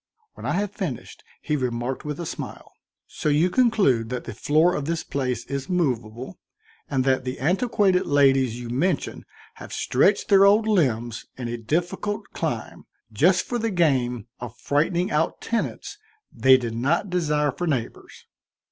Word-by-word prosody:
When - - -7
I - - 0
had 200 +2 -1
finished, 170 - -6 0.2
he 150 - 0
remarked 125 -1 -2
with 150 +1 -4
a 170 - -4
smile: - - -7 0.3
"So - - -3
you 155 +5 +3
conclude 195 - +2
that 125 -1 -4
the - - -7
floor 155 - +2
of 145 - -2
this 165 +1 -2
place 125 -4 -3
is 140 0 -5
movable 125 - -2 0.5
and 135 -2 +1
that 130 0 +1
the 130 0 -5
antiquated 190 - +2
ladies 135 -4 +3
you 120 -1 -7
mention 155 +6 -1 0.3
have - - -10
stretched 195 +10 +1
their 195 -1 +7
old 210 +2 +5
limbs 120 - 0
in 125 -2 -4
a 120 - -3
difficult 175 - -2
climb, - - -4 0.3
just - - +3
for 240 - -2
the 230 0 -1
game 130 - +1
of 120 -1 -8
frightening 170 +6 0
out 150 +2 0
tenants 235 - -3 0.3
they 130 0 +5
did 120 -3 -4
not 160 - 0
desire 150 -4 +1
for 175 +6 -4
neighbors?" 130 -7 -4
145 Hz, 160 wpm, -24 LUFS, 125-180 Hz, 0.5 s, their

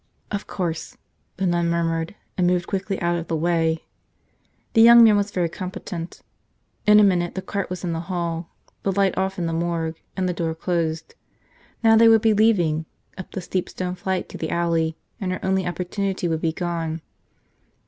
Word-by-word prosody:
"Of 205 -1 -3
course," 170 -4 -4 0.4
the 190 - -1
nun 175 -1 +1
murmured 165 +1 -1 0.2
and 180 -2 +2
moved 180 -1 +1
quickly 195 0 -2
out 170 0 +1
of 170 - -7
the 165 - -1
way. 165 0 +1 0.9
The 225 - +6
young 235 +1 +9
man 220 -2 +7
was 205 0 +1
very 180 -4 0
competent. 180 -1 -7 0.6
In 210 0 +8
a - - +7
minute 175 -3 +2
the 190 - -2
cart 200 -1 -3
was 180 0 -5
in 175 -2 -1
the 165 - -2
hall, 170 -2 -2 0.3
the 195 - 0
light 195 -1 +2
off 190 0 -1
in 175 - -1
the 165 - -1
morgue 165 -1 -2 0.2
and 185 -1 0
the 180 - 0
door 165 -2 -2
closed. 160 -2 -2 0.7
Now 225 0 +6
they 230 +1 +7
would 225 -1 +6
be 220 -1 +5
leaving, 175 -8 +2 0.3
up 185 - -8
the 190 - -5
steep 180 0 -2
stone 180 -1 -4
flight 185 0 -2
to - - -9
the 160 - -3
alley, 165 -2 0 0.2
and 185 -2 -2
her 185 - -4
only 190 -1 +1
opportunity 185 +1 -2
would 160 -1 -1
be 165 - +1
gone. 165 -1 -3
175 Hz, 190 wpm, -23 LUFS, 165-190 Hz, 0.9 s, young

